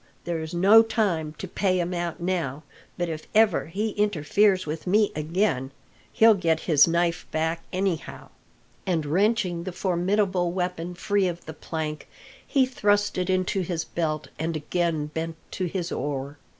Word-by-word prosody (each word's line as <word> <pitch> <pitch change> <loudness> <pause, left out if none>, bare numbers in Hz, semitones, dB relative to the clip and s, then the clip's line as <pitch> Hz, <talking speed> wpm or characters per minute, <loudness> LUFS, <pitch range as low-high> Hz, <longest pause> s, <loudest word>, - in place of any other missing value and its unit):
There's 160 -2 -3
no 195 +6 +7
time 185 -9 -1
to 190 - -6
pay 185 0 0
him 175 +1 -1
out 175 -1 -3
now, 170 -5 -2 0.3
but 175 - -1
if 155 -2 -6
ever 215 -7 +4
he 205 +7 -2
interferes 200 0 +2
with 155 +3 -5
me 210 +3 +3
again 155 -3 0 0.4
he'll 225 0 +6
get 165 -5 +1
his 150 -3 +5
knife 170 0 0
back, 160 +1 -1
anyhow!" 185 -3 -3 0.6
and 165 -4 0
wrenching 185 +1 +1
the 185 - -4
formidable 185 0 0
weapon 180 -1 -3
free 200 +1 +1
of 175 -1 -5
the 160 - -7
plank, 155 0 -5 0.4
he 270 -2 +3
thrust 205 -5 +1
it 180 0 -1
into 185 +1 +1
his 170 -2 -2
belt 155 -3 -3
and 160 +1 -2
again 160 0 -1
bent 160 +2 -4 0.2
to 185 - -2
his 175 0 -3
oar. 140 0 -4
175 Hz, 155 wpm, -25 LUFS, 160-195 Hz, 0.6 s, no